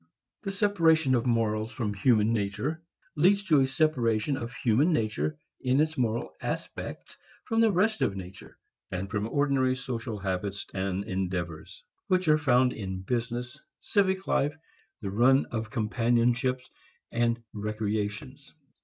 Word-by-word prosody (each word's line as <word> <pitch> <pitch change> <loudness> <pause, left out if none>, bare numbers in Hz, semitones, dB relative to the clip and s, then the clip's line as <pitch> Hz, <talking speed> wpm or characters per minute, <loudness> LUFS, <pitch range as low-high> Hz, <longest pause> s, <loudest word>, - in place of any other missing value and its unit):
The 200 - -4
separation 165 -8 +3
of 120 0 +1
morals 110 -2 +1
from 110 -6 -2
human 110 +1 +3
nature 110 +10 -2 0.3
leads 195 +6 +4
to 155 -7 +4
a 135 - +3
separation 130 -4 +1
of 120 -2 -5
human 130 +5 +2
nature 75 - -1 0.2
in 130 +2 +2
its 155 +1 +1
moral 120 -3 -1
aspects - - -5 0.3
from 225 0 +1
the 225 -1 +5
rest 210 +4 +1
of 100 - +1
nature, 95 0 -10 0.3
and 95 +1 -4
from 105 +1 -1
ordinary 135 -2 +2
social 120 -3 -4
habits 95 +1 -3
and 95 0 -2
endeavors 90 -5 -4 0.2
which 185 -1 +1
are 155 0 +5
found 125 -3 +3
in 95 -3 -5
business, 120 +4 -3 0.2
civic 190 -2 +1
life, 145 +2 +1 0.4
the 100 -3 -4
run 130 +6 +4
of 110 -2 -3
companionships 120 +4 +1 0.4
and 115 0 0
recreations. 110 +6 -4
120 Hz, 135 wpm, -28 LUFS, 105-145 Hz, 0.4 s, the